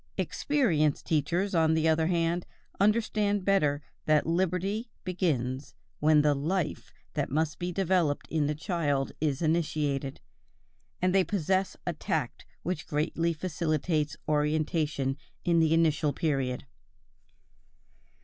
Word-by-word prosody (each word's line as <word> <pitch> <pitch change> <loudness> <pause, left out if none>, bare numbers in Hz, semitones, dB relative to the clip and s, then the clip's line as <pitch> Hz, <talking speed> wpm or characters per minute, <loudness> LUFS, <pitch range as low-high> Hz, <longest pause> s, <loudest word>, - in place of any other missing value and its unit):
Experienced 170 - +1
teachers, 170 +6 0
on 160 -2 +3
the 160 0 +2
other 160 0 +3
hand, 170 0 0 0.3
understand 210 -1 +2
better 150 -7 +2 0.2
that 155 -1 +3
liberty 185 +6 0
begins 140 -7 -1 0.2
when 150 0 +5
the 150 -1 +4
life 155 +3 -2 0.2
that - - -1
must 150 +2 -1
be 175 +1 -2
developed 180 -5 +1
in 155 -3 +1
the 150 - -1
child 150 -5 -1
is 150 0 0
initiated, 150 -4 0 0.8
and 185 0 +3
they 195 -1 +5
possess 190 0 0
a 175 - -1
tact 150 -4 -3 0.2
which 180 -3 -3
greatly 165 +3 0
facilitates 155 -2 -1
orientation 150 -2 0 0.3
in 170 -1 +4
the 160 -1 +3
initial 155 -2 +3
period. 135 -5 -1
160 Hz, 120 wpm, -29 LUFS, 150-180 Hz, 0.8 s, when